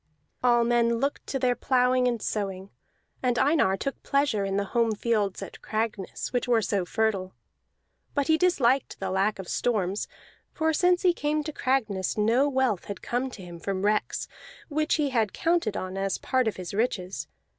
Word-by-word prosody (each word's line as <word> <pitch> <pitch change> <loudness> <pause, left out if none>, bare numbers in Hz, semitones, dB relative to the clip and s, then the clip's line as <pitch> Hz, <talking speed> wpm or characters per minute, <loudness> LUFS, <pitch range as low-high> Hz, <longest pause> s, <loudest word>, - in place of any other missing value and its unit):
All 240 -1 +5
men 235 0 +3
looked 275 +4 -2
to 270 - -1
their 250 -1 +2
plowing 250 0 +2
and 240 -2 0
sowing; 195 -2 -3 0.5
and 245 -2 +1
Einar 270 -10 +3
took 275 +7 -4
pleasure 275 -7 +1
in 195 0 -1
the 200 - 0
home 230 -2 +3
fields 210 -3 0
at - - -10
Cragness, 215 -2 -3
which 245 - 0
were 235 -3 +3
so 195 -3 0
fertile. 195 -2 -1 0.8
But 285 -1 +2
he 315 - +4
disliked 275 -7 +2
the 190 -1 -3
lack 195 +3 +1
of 190 -2 -7
storms, 205 -4 0 0.5
for 320 0 +1
since 355 +3 +3
he 360 -2 +5
came 300 -1 -1
to 310 0 -5
Cragness 220 -10 0
no 235 +7 +3
wealth 260 -8 +1
had 200 - -7
come 250 +2 -1
to 210 -7 -10
him 175 -1 -9
from 195 +2 -2
wrecks, 210 0 0 0.4
which 305 +1 +1
he 290 -3 0
had 225 -5 +1
counted 335 - +1
on 185 0 -4
as 195 0 -1
part 255 -2 0
of 220 - -1
his 185 0 -6
riches. 195 -4 -1
235 Hz, 180 wpm, -27 LUFS, 200-265 Hz, 0.8 s, All